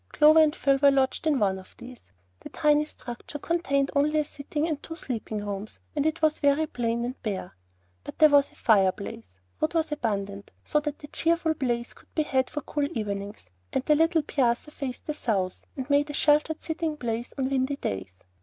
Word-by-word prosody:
Clover 305 +1 +7
and 310 -1 +4
Phil 275 0 +2
were 285 - +8
lodged 270 +3 +1
in 300 -3 +3
one 195 -4 +1
of 185 - -16
these. 245 0 -11 0.4
The - - -10
tiny 300 -1 +3
structure 245 -1 -8
contained 280 -4 0
only 300 +2 +3
a 300 - +1
sitting 295 +2 -3
and 310 -3 -2
two 325 - -7
sleeping 220 -8 -4
rooms, 205 +1 -5 0.2
and 305 +1 +2
was 310 -1 +3
very 285 +2 +3
plain 235 -4 -1
and 255 +2 -6
bare. 195 -5 -4 0.5
But - - -9
there 310 -1 +7
was 285 -1 +5
a - - -23
fireplace; 190 - +1 0.2
wood 315 +2 0
was 320 -1 +1
abundant, 200 -7 -3
so 300 - +1
that 295 0 -5
a - - -7
cheerful 330 -1 +1
blaze 240 -5 -2
could - - -22
be 310 - +2
had 265 -3 0
for 295 - -4
cool 290 -1 -1
evenings; 200 - -4 0.3
and 255 - 0
the 305 - +5
little 325 +1 +3
piazza 260 0 0
faced 260 -4 -6
the 305 - -2
south, 195 -10 -2
and 260 -1 -4
made 285 +1 +3
a - - -4
sheltered 300 +2 +2
sitting 320 -1 -2
place 235 -2 -4
on 265 0 -1
windy 265 +1 +1
days. 95 - -5
275 Hz, 200 wpm, -27 LUFS, 230-300 Hz, 0.5 s, were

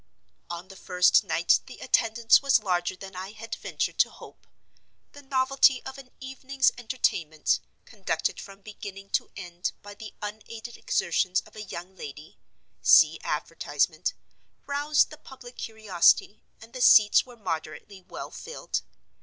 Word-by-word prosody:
On 175 +1 -6
the 195 - -11
first 180 -1 +3
night 165 +2 +3
the 260 - -11
attendance 225 -2 +3
was 275 -5 +3
larger 180 -2 0
than 195 0 -11
I 190 +3 -7
had 225 +1 -8
ventured - - -3
to - - +5
hope. - - -15 0.6
The 285 - -13
novelty 265 -1 +3
of 265 +1 -8
an 260 -2 -13
evening's 265 0 0
entertainment, 175 -10 0 0.3
conducted - - -3
from 195 0 -12
beginning 195 -1 -10
to - - 0
end 175 -2 -5
by 205 0 -10
the 215 +1 -11
unaided 220 +2 -8
exertions 185 +1 0
of - - -20
a 215 - -7
young 190 -2 -8
lady 150 -2 -10 0.4
(see - - +6
advertisement), - - -1 0.5
roused 290 +2 +2
the 305 - -11
public 255 -2 -13
curiosity, 215 -2 +2 0.2
and 225 +2 -15
the 255 - -6
seats 210 -4 +7
were 245 -1 -14
moderately 190 +1 -6
well - - -9
filled. 485 - -5
215 Hz, 145 wpm, -27 LUFS, 185-255 Hz, 0.6 s, seats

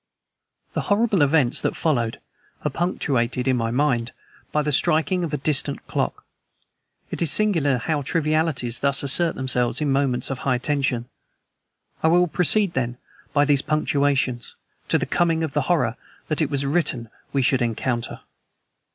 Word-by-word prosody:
The - - -1
horrible 205 -3 +2
events 140 -3 +3
that - - -1
followed 120 -8 -1 0.5
are 150 - 0
punctuated, 130 -7 -1
in 130 - +3
my 115 -2 -1
mind, 120 -2 0 0.4
by 150 - +1
the 150 - -1
striking 170 +5 +2
of 165 - -3
a 150 - -1
distant 145 -1 +1
clock. - - -3 0.9
It - - -5
is 165 - +2
singular 165 -11 +2
how 150 +4 -1
trivialities 155 -5 0
thus 140 0 +1
assert 165 +4 +3
themselves 125 -2 0
in 150 -2 0
moments 135 -2 0
of 130 - -4
high 130 -2 0
tension. 130 -3 -1 0.9
I - - +3
will 175 +2 +4
proceed, 180 +4 +2
then, 120 -1 -2 0.3
by 145 0 +3
these 140 -1 +3
punctuations, 140 -5 0 0.3
to - - +2
the - - -2
coming 165 -1 +1
of 155 -3 -3
the 150 - +1
horror 125 -9 +1 0.3
that 155 +1 -1
it 150 - +1
was 140 -1 -1
written 140 -7 -1 0.2
we 135 -1 +1
should 130 +1 +2
encounter. 120 +1 -2
140 Hz, 160 wpm, -23 LUFS, 125-160 Hz, 0.9 s, will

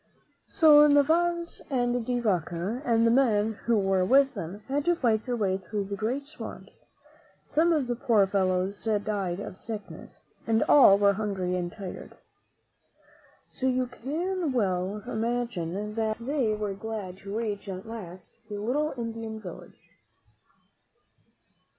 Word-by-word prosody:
So 300 -2 +7
Narvaez 335 +4 +2
and 245 -3 0
De 245 +1 -1
Vaca 190 - -1
and 230 -3 +3
the 230 - +4
men 220 -4 +2
who 235 -1 +3
were 195 -2 +2
with 270 +7 +4
them 185 +6 -7
had 280 +2 0
to 345 0 +3
fight 230 -6 0
their 245 - 0
way 195 -4 0
through 200 +2 -4
the 200 +1 -5
great 245 +7 -2
swamps. 305 +2 -10 0.7
Some 325 +3 +4 0.3
poor 220 -5 +3
fellows 190 0 0
died 205 -4 -1
of 190 -2 -7
sickness, 215 -2 -9 0.2
and 225 0 +3
all 255 -9 +7
were 200 0 +4
hungry 195 -3 -2
and 175 -1 -2
tired. 195 -3 -9 1.3
So 260 - -2
you 255 0 +1
can 315 +7 -3
well 195 -2 -1
believe 215 -4 -3
that 220 -1 0
they 240 -3 0
were 210 -2 -3
glad 200 -2 -6
to 200 +2 -5
reach 210 -3 -3
at 185 0 -6
last 190 -6 -9 0.2
a 210 - -5
little 270 +9 -1
Indian 225 -1 -5
village. 180 -5 -10
220 Hz, 140 wpm, -27 LUFS, 195-250 Hz, 1.3 s, So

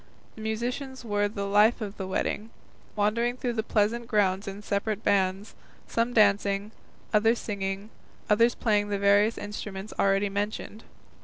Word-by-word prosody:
The 220 - -11
musicians 245 +4 -3
were 205 -1 +1
the 200 -1 -4
life 210 +3 +4
of 210 -2 -6
the 190 - -4
wedding, 210 +3 -2 0.5
wandering 230 +4 +1
through 245 -1 -2
the 225 - 0
pleasant 225 +2 0
grounds 200 -3 +1
in 200 +1 -6
separate 205 +1 -2
bands, 195 0 +1 0.3
some 230 +1 0
dancing, 205 -2 +3 0.4
others 225 +2 +4
singing, 200 0 -4 0.4
others 230 +3 +4
playing 210 -2 +1
the 200 - 0
various 200 +3 +3
instruments 205 -1 -6
already 195 +1 +3
mentioned. 205 +2 -4
210 Hz, 145 wpm, -27 LUFS, 200-225 Hz, 0.5 s, life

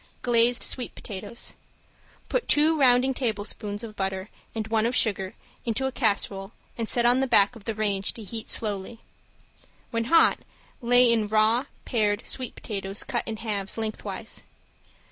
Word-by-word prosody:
~GLAZED 240 0 +4
SWEET 250 - 0
POTATOES~ 205 +2 -4 0.7
Put - - -1
two 310 +2 +4
rounding 255 0 +5
tablespoons 210 -3 -3
of 220 -2 -8
butter 190 0 -3 0.3
and 220 -1 -3
one 220 0 +2
of 245 - -1
sugar 195 -5 +1 0.3
into 235 +3 -1
a 265 - 0
casserole 200 -5 -1 0.2
and 230 -2 -3
set 240 -1 +2
on 245 +2 +5
the 265 - +1
back 205 -1 +4
of 220 -3 -13
the 225 - -2
range 200 -2 0
to 225 - -7
heat 220 +2 -6
slowly. 210 +1 -3 0.9
When 230 -1 -1
hot 330 +6 +5 0.4
lay 245 0 +5
in 220 -2 +1
raw, 220 +4 +3 0.2
pared 210 -3 0
sweet 255 -3 -3
potatoes 195 -2 -3
cut 240 - -2
in 220 -1 -3
halves, 210 -3 -2
lengthwise. 220 -1 -4
225 Hz, 155 wpm, -26 LUFS, 205-245 Hz, 0.9 s, rounding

